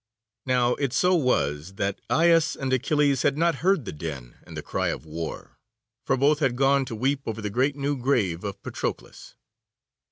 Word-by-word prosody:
Now 125 -1 +3
it 140 -4 -1
so 180 0 +3
was 85 - 0
that 100 0 -2
Aias 165 -1 +3
and 130 -1 -2
Achilles 140 +1 +2
had 140 0 +1
not 165 -2 +2
heard 185 - +2
the - - -4
din 75 -6 -7
and - - -9
the - - -5
cry - - -2
of - - -3
war, 80 +1 -7 0.5
for 135 - +2
both 145 +3 +3
had 135 -5 +1
gone 135 +1 +3
to 115 - -6
weep 135 +5 0
over 110 -1 -3
the 105 -2 -4
great 135 +6 +1
new 145 0 -1
grave 120 -10 0
of 100 -1 -5
Patroclus. - - -6
130 Hz, 185 wpm, -25 LUFS, 100-145 Hz, 0.5 s, Now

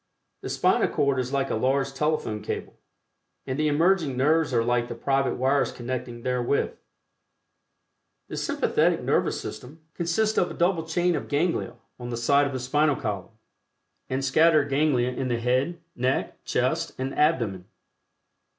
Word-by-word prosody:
The - - -5
Spinal - - +2
Cord 140 -2 +1
is 125 0 -2
like 135 -1 0
a - - +1
large 135 +4 0
telephone 150 -7 -1
cable, - - -5 0.7
and 130 +1 -3
the 155 - +2
emerging 160 -2 +2
nerves 155 +3 +2
are 115 -2 +2
like 120 0 +1
the - - -6
private 135 +3 0
wires 135 +2 +1
connecting 120 -1 -5
therewith. 125 +2 0 1.6
The - - -6
Sympathetic - - +1
Nervous - - +1
System 145 +6 -8
consists 210 +6 +1
of 175 - +1
a - - -7
double 170 -2 +1
chain 175 +1 +1
of 145 - -4
Ganglia 155 -1 0 0.2
on 120 0 -6
the 120 - -3
side 140 +4 +3
of 140 - -5
the 130 - -2
Spinal 145 +4 +2
column, 105 -2 -5 0.7
and 135 +1 -1
scattered 155 +1 +4
ganglia 135 -3 +2
in 130 +1 -3
the 120 -2 0
head, 130 +8 0 0.2
neck, 130 +2 -2
chest - - 0
and 130 +1 -3
abdomen. 115 - +1
135 Hz, 155 wpm, -26 LUFS, 125-155 Hz, 1.6 s, scattered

